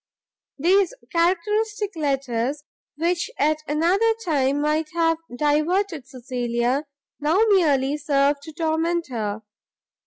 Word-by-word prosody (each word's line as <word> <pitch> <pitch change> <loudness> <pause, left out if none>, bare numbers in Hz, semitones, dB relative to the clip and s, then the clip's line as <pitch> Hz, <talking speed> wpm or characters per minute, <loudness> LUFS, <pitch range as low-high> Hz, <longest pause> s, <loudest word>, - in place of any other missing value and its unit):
These 365 +5 +3 0.2
characteristic 415 +4 0
letters, 275 -2 -1 0.3
which 340 +3 0
at 305 +2 +2
another 365 +10 +2
time 280 -4 +1
might 305 +1 0
have 330 -1 +2 0.2
diverted 305 +2 0
Cecilia, 250 +2 -2 0.3
now 310 +5 +2
merely 295 -7 +3
served 285 -1 +1
to 315 - -10
torment 330 +1 -1
her. 220 -3 -3
305 Hz, 100 wpm, -23 LUFS, 275-340 Hz, 0.3 s, These